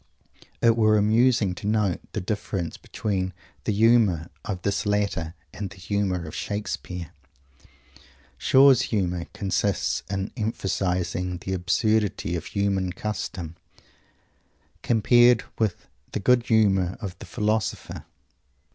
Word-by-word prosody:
It 115 -1 +6
were 110 -2 +4
amusing 110 -1 +3
to 95 +3 -6
note 105 -4 +1
the 105 - -2
difference 95 -3 -3
between 95 -3 -3 0.3
the - - +1
"humour" 105 -6 +3
of 95 -4 -5
this 100 0 -1
latter 100 -5 -1 0.2
and 100 -1 -5
the 100 - -13
"humour" 95 -1 -1
of 75 - -8
Shakespeare. 90 -5 -4 1.3
Shaw's 135 -2 +6
humour 90 -5 -1
consists 100 -1 0
in 95 0 -2
emphasizing 90 -5 -1
the 95 +2 -5
absurdity 100 +1 +1
of 85 - -4
human 100 -3 0
Custom, 95 -5 -5 1.3
compared 120 +1 +5 0.2
with 110 -5 -1 0.3
the - - -1
good 120 +3 +3
sense 95 -5 +3
of 100 -5 -6
the - - -10
philosopher. 110 +1 -2
100 Hz, 115 wpm, -25 LUFS, 90-110 Hz, 1.3 s, It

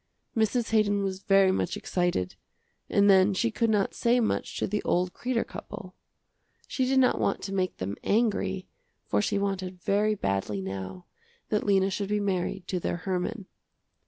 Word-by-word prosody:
Mrs. 225 +1 +1
Haydon 205 -2 +2
was 190 -1 -3
very 195 -1 +4
much - - -1
excited, 175 - -1 0.6
and 200 0 +4
then 195 0 +5
she 230 +4 +1
could 225 +1 +1
not 205 -3 +1
say 240 +1 +2
much 225 - -1
to - - 0
the 210 +1 -1
old 180 0 0
Kreder 245 -2 -1
couple. - - -9 0.7
She 260 - 0
did 265 +1 +2
not 260 -1 +4
want - - 0
to 195 - -4
make 185 -2 -1
them 95 +2 -3
angry, 200 -4 0 0.4
for - - +1
she 205 0 0
wanted 190 -2 -2
very 210 +3 +1
badly 100 - -1
now 95 -1 -6 0.4
that 210 - 0
Lena 195 -1 +3
should 200 +1 -3
be 210 0 +1
married 190 -1 -2
to 185 - -1
their 175 - -2
Herman. 190 +4 -3
195 Hz, 170 wpm, -28 LUFS, 180-210 Hz, 0.7 s, then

